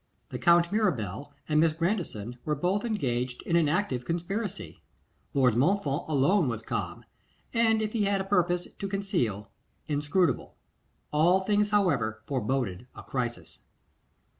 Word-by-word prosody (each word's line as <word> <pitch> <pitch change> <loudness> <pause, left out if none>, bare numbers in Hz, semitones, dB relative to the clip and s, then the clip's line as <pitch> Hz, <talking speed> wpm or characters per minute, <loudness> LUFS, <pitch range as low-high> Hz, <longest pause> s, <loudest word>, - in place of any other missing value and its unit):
The - - -5
Count 170 -1 +4
Mirabel 145 - -1 0.2
and 150 -1 +2
Miss 160 0 +4
Grandison 155 - -2
were 150 - 0
both 180 +7 0
engaged 125 - -2
in 170 - 0
an 165 -3 +4
active 150 -8 0
conspiracy. 170 - -4 0.5
Lord 130 -4 +4
Montfort 150 +1 +1
alone 160 +4 +3
was 115 -2 -3
calm, - - -4 0.5
and 225 -1 +3
if 215 - -3
he 215 -3 +1
had 200 0 +1
a - - -1
purpose 180 -2 +1
to 200 - -3
conceal, 120 - -2 0.4
inscrutable. 150 +4 0 0.6
All 170 +5 +4
things, 205 +1 +1
however, 145 - +1
foreboded 125 -5 -2
a - - -9
crisis. 120 -2 -4
165 Hz, 140 wpm, -28 LUFS, 125-195 Hz, 0.6 s, Count